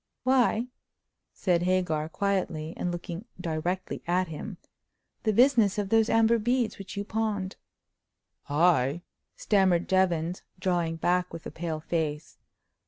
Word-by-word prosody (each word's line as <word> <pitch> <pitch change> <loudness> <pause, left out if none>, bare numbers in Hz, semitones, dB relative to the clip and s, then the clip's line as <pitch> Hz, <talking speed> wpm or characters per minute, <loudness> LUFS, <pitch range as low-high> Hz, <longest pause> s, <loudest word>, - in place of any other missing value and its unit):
"Why," 250 -3 +3 0.7
said 175 -3 +1
Hagar, 175 -4 0
quietly, 170 -4 -1
and 180 - -2
looking 175 +3 -6
directly 175 +2 -3
at 180 0 +1
him, 170 +5 -6 0.6
"the 220 - +1
business 230 -3 +4
of 205 -2 -1
those 225 0 +4
amber 225 +1 +4
beads 240 0 0
which 195 +1 -8
you—pawned." 205 -2 -2 0.9
"I," 155 0 +3 0.3
stammered 190 -4 +2
Jevons, 180 -2 +1 0.2
drawing 175 -3 0
back 180 +2 +1
with 165 -1 -8
a - - -5
pale 160 -2 -4
face. 155 -2 -3
180 Hz, 120 wpm, -28 LUFS, 165-210 Hz, 0.9 s, business